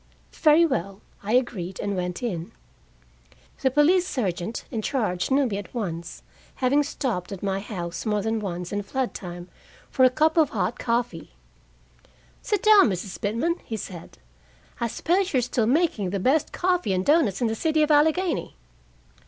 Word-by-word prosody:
"Very 315 +2 +5
well," 195 - -2 0.2
I 210 +3 -2
agreed, 195 -8 0
and 200 -1 -2
went 180 +5 -3
in. 175 -8 -4 1.1
The 265 - +3
police 335 +7 +3
sergeant 195 - -3
in 225 -4 -2
charge 210 -8 -1
knew 275 +1 +3
me 205 -5 -2
at 205 - -11
once, 170 -7 -5 0.3
having 275 +3 +2
stopped 250 - -3
at 195 -1 -7
my 195 -1 0
house 175 -5 -5
more 210 -2 0
than 220 +1 0
once 180 -4 -5
in 205 0 -1
flood 260 +5 -3
time 175 -1 -8 0.4
for 260 - +2
a 255 - +8
cup 310 +5 +1
of 310 -4 +5
hot 235 - -2
coffee. 230 - -2 1.1
"Sit 415 - -1
down, 425 - +7
Mrs. 190 0 -5
Pitman," 235 - 0
he 220 - -5
said. 180 -4 -9 0.6
"I 235 - 0
suppose 360 - 0
you - - +3
are - - +3
still 235 -2 0
making 260 - +1
the 200 +2 -2
best 275 +9 +2
coffee 360 - 0
and 185 0 -1
doughnuts 290 - +3
in 245 - +1
the 220 - 0
city 310 +6 +1
of 305 - +1
Allegheny? 320 +4 +2
230 Hz, 170 wpm, -25 LUFS, 190-295 Hz, 1.1 s, a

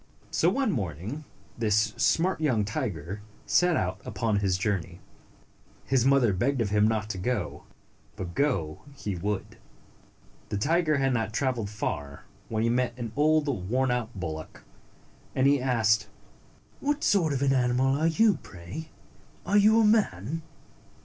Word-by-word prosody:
So, 170 - +3
one 260 +2 +1
morning, 105 - -4 0.3
this 110 -1 +1
smart 170 0 +2
young 120 -9 +2
tiger 100 - -4 0.2
set 180 -2 +3
out 95 +2 -2
upon 110 -3 -1
his 95 -3 +1
journey. 90 -3 -2 0.9
His 130 -3 +2
mother 135 -6 +4
begged 130 +9 0
of 105 -4 0
him 105 0 +4
not 110 -2 0
to 95 - -5
go, 105 -1 -3 0.5
but 90 -2 -6
go 105 - 0
he 105 -8 -4
would. 100 +3 -4 0.9
The 105 - -2
tiger 155 - +2
had 135 -1 +1
not 110 -2 -1
traveled 125 -5 -1
far 70 -9 -4 0.3
when 110 0 -1
he 115 - +2
met 120 0 0
an 115 -3 -5
old 155 +1 +3 0.2
worn 130 +2 +2
out 125 -2 -1
bullock, 80 -3 -6 0.7
and 130 - +2
he 140 -1 +4
asked, 110 -4 +2 0.7
"What 290 +1 -1
sort 175 -7 +3
of 140 -1 0
an 135 -1 +3
animal 130 +1 +2
are 155 +3 +1
you, 200 +3 +3
pray? 95 - -9 0.6
Are 195 - 0
you 215 +2 +5
a 225 - +5
man?" 165 - +1
120 Hz, 150 wpm, -27 LUFS, 100-150 Hz, 0.9 s, you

